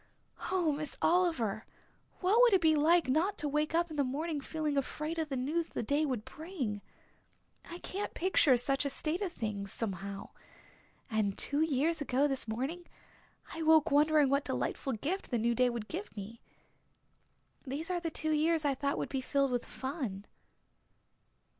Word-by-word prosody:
Oh, 355 -4 +2
Miss 300 0 -3
Oliver, 295 - +2 0.6
what 400 +6 +4
would - - +6
it 380 - +5
be 320 -1 +5
like 325 +1 +4
not 320 +10 +1
to 295 - +1
wake 300 +2 0
up 340 0 +1
in 305 - -6
the 285 - +3
morning 295 +3 -2
feeling 305 0 -2
afraid 305 +4 -2
of 315 -2 -2
the 275 - -2
news 305 +6 -1
the - - -4
day 290 +6 +1
would 245 -6 -3
bring? 285 - -5 0.9
I 340 - -6
can't 395 +3 -5
picture 330 -7 +4
such 270 +3 0
a 280 - -1
state 310 +6 -1
of 385 -4 -1
things 205 - -4
somehow. 195 -2 -4 0.8
And 210 -3 0
two 285 +2 +1
years 315 +1 +1
ago 275 +1 +2
this 270 -4 -3
morning 270 +11 -3 0.7
I 330 - -5
woke 315 -1 +5
wondering 295 0 +4
what 280 +1 +2
delightful 270 - -2
gift 310 - -3
the 240 - 0
new 235 +1 +1
day 250 +1 +3
would 235 -3 -4
give 360 - -6
me. 210 +3 -8 1.3
These 305 +7 -3
are 355 - 0
the 335 -1 -3
two 315 0 -1
years 310 +1 +2
I 280 - +3
thought 280 +2 -1
would - - -2
be 270 - -2
filled 275 0 +1
with 245 -1 -1
fun." 260 - -5
290 Hz, 175 wpm, -32 LUFS, 255-330 Hz, 1.3 s, would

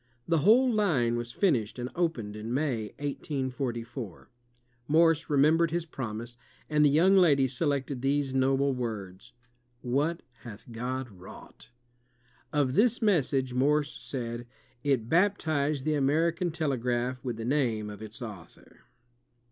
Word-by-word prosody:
The 165 -1 +2
whole 230 - +5
line 145 - +2
was 120 0 -4
finished 125 - +1
and 125 +1 -4
opened 125 -12 -1
in 110 +2 -6
May, 130 -5 0
1844. 130 - -4 0.6
Morse 165 +1 +3
re 145 - +1
membered 160 +4 +4
his 170 +1 -2
promise, 120 -5 -6 0.3
and 150 -1 +3
the 145 - +6
young 175 +7 +4
lady 145 -8 +5
selected 135 0 -2
these 135 0 0
noble 135 +1 +2
words: 105 -7 -5 0.5
"What 145 +7 -1 0.2
hath 115 0 -11
God 125 +3 -3
wrought!'' 95 +3 -14 0.8
Of 145 -4 +1
this 235 - +3
mes 195 - +3
sage 130 -3 -1
Morse 145 +3 +2
said, 120 -2 -5 0.4
*'It 135 -6 +1
baptized 155 -5 +1
the 155 - +1
American 165 +5 +1
telegraph 125 -5 -1
with 120 -4 -3
the 115 - -5
name 120 -6 0
of 105 0 -10
its 110 +2 -8
Author.'' 100 -8 -11
135 Hz, 135 wpm, -28 LUFS, 120-155 Hz, 0.8 s, the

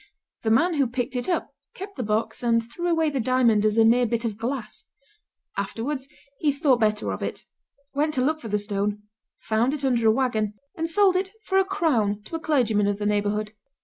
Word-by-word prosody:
The 220 - -1
man 320 +11 +3
who 280 -4 +2
picked 245 +2 -3
it 245 +4 -2
up 350 - -1 0.2
kept 395 +2 -8
the 255 - -4
box 220 +1 -1
and 230 -1 +2
threw 345 +9 -4
away 325 -2 +2
the 275 - -1
diamond 235 -3 +3
as 215 0 +2
a 225 - +6
mere 240 +2 +4
bit 235 +1 -1
of 220 -3 -2
glass. 230 0 -5 0.7
Afterwards 265 +3 -3 0.3
he 300 - +2
thought 280 -3 +2
better 215 -1 +1
of - - -5
it; - - -4 0.5
went 300 +2 0
to 255 - +2
look 310 +3 +1
for 230 - -8
the 210 -1 +1
stone, 205 0 -2 0.3
found 235 +6 0
it 285 -2 -3
under 240 -4 +2
a - - +7
wagon, 220 -4 0 0.2
and 325 0 -2
sold 385 +2 +4
it 380 +1 0
for 385 0 +2
a - - +4
crown 255 - 0
to 325 - -7
a - - -2
clergyman 240 -10 +2
of 205 -1 0
the 210 - -3
neighborhood. 210 +1 0
240 Hz, 215 wpm, -25 LUFS, 215-300 Hz, 0.7 s, a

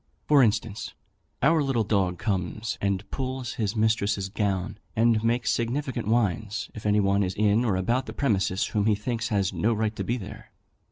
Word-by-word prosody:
For 145 -2 +6
instance, 110 -1 0 0.5
our 160 +3 +4
little 135 -5 +1
dog 95 -4 +1
comes 100 +3 -2
and 100 0 -1
pulls 130 -2 -3
his 105 +1 -1
mistress's 110 -3 +1
gown 100 -1 -2 0.2
and 115 -1 +3
makes 120 +1 +1
significant 120 -1 -2
whines, 110 -2 0
if 105 -1 -5
any 105 0 +3
one 100 0 +2
is 95 -1 -1
in 105 +2 +3
or 110 -6 +1
about 120 +8 0
the - - -6
premises 100 -8 +1
whom 105 0 0
he 105 - +4
thinks 115 +2 -2
has 100 -4 0
no 115 +2 +1
right 110 0 -1
to - - -3
be 120 - -1
there. 100 - -9
110 Hz, 180 wpm, -26 LUFS, 100-120 Hz, 0.5 s, For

